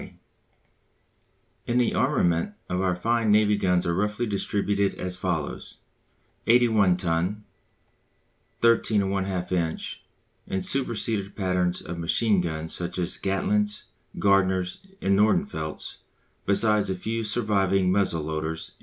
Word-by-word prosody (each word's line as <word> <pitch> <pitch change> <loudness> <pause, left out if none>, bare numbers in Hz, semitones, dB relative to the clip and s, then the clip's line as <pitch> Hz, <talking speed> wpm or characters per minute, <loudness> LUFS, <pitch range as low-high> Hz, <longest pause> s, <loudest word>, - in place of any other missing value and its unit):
_] - - -11 1.5
In 120 - +1
the 125 -2 +2
armament 85 +4 +1
of 90 +1 -1
our 90 -2 +1
fine 115 +4 0
Navy 105 0 +4
guns 90 -3 +1
are 85 - +1
roughly 105 +6 -1
distributed 100 -1 0
as 90 0 -3
follows: 90 -5 -3 0.7
81 110 -6 +4
ton, 90 +4 -1 1.2
13 115 -3 +3
1/2 95 -2 -2
inch, 85 -3 -2 0.4
and 95 - -2
superseded 110 -6 -1
patterns 90 -2 0
of 85 0 -6
machine 100 +4 +2
guns 80 -1 -4
such 90 +1 -4
as 90 0 -1
Gatling's, 105 +2 0 0.3
Gardner's, 95 -2 +2 0.2
and 100 0 +3
Nordenfelt's, 90 -7 0 0.5
besides 105 +1 +3
a 95 - 0
few 115 +5 -3
surviving 100 -4 +1
muzzle 95 -5 +1
loaders, 80 +1 -3
&c. - - -23
95 Hz, 120 wpm, -26 LUFS, 90-105 Hz, 1.5 s, Navy